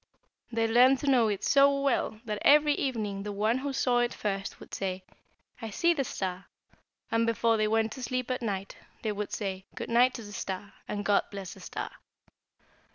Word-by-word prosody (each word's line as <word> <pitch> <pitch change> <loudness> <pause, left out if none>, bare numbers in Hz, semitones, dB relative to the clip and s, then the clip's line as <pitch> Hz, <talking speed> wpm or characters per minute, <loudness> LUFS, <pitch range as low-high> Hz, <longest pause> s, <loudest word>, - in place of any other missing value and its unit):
They 225 -1 +1
learned 250 +4 +6
to 290 - -3
know 250 -5 +5
it 205 -2 -2
so 280 0 +5
well 275 -5 0
that 210 -2 -3
every 295 0 +6
evening 215 -8 -2
the 205 +1 -4
one 215 +5 +1
who 280 +1 -3
saw 250 -2 +2
it 240 0 0
first 195 -1 -3
would - - -13
say, 190 -1 -3 0.6
'I 225 - -4
see 340 +11 +2
the 285 -4 0
star,' 185 -5 -4 0.6
and 230 0 +2
before 230 0 +2
they 215 -1 +2
went 220 0 +1
to 260 - -7
sleep 255 0 -2
at 255 +1 -2
night 200 -4 -3 0.3
they 220 - 0
would 205 0 -4
say 190 -2 -4
'Good - - -5
night' 250 +2 +4
to 235 - -6
the 205 0 -10
star, 195 +1 -5
and, 205 -1 -3
'God 205 -1 +3
bless 195 -2 -7
the - - -14
star!' - - -5
225 Hz, 200 wpm, -29 LUFS, 205-255 Hz, 0.6 s, learned